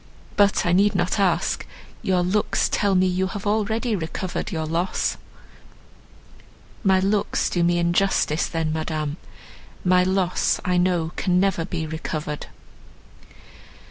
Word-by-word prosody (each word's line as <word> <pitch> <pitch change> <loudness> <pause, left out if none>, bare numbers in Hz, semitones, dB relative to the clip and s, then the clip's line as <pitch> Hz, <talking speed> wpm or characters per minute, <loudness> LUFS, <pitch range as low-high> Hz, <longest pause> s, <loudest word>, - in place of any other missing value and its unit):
But 200 -2 +3
I 175 - +2
need 200 +3 +3
not - - 0
ask, - - +1 0.4
your 185 -2 +1
looks 195 +4 +1
tell 200 -2 +1
me 185 0 +4
you 185 +1 0
have 200 +1 -6
already 220 +2 0
recovered 180 +3 -4
your 160 -3 -2
loss." 170 +4 -1 1.7
"My 190 -2 +4
looks 200 +2 0
do 175 - +1
me 175 0 +2
injustice 170 -2 +1
then, 160 -2 -2
Madame, 155 -1 -3 0.7
my 180 0 +5
loss 185 -1 +1
I 180 -1 +1
know 175 -2 +1
can 180 -2 +2
never 190 -4 +1
be 165 -2 -3
recovered." 155 -1 -5
180 Hz, 130 wpm, -23 LUFS, 165-195 Hz, 1.7 s, my